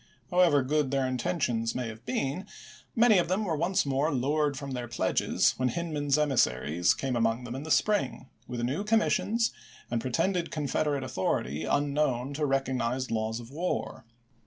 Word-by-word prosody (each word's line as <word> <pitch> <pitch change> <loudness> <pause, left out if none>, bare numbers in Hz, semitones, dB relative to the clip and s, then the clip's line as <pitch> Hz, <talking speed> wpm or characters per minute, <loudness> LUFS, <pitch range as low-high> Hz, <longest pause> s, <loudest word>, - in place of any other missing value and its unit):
However 175 -6 +4
good 145 +1 +1
their 135 -1 +1
intentions 125 -3 -1
may 125 -2 -2
have 110 0 -10
been, 135 +7 -2 0.5
many 225 -4 +6
of 175 - 0
them 190 +5 0
were 165 -4 0
once 175 +4 +1
more 140 +3 +1
lured 145 +2 0
from 140 0 -6
their 125 -2 -4
pledges 120 0 +1
when 130 0 +1
Hindman's 150 -3 -1
emissaries 90 - +2
came 135 -2 -2
among 115 +1 +1
them 120 -1 -6
in 135 - -5
the 160 - -7
spring, 205 -7 +1 0.2
with 120 -1 -4
new 135 +11 -1
commissions, 225 +1 +2 0.4
and 120 -1 0
pretended 170 +8 0
Confederate 145 -2 -1
authority 80 - -2
unknown 145 -2 0
to 150 +1 -1
rec 135 0 +1
ognized 130 0 -2
laws 110 0 -1
of 120 +1 -11
war. 155 -4 -3
135 Hz, 165 wpm, -29 LUFS, 120-155 Hz, 0.5 s, many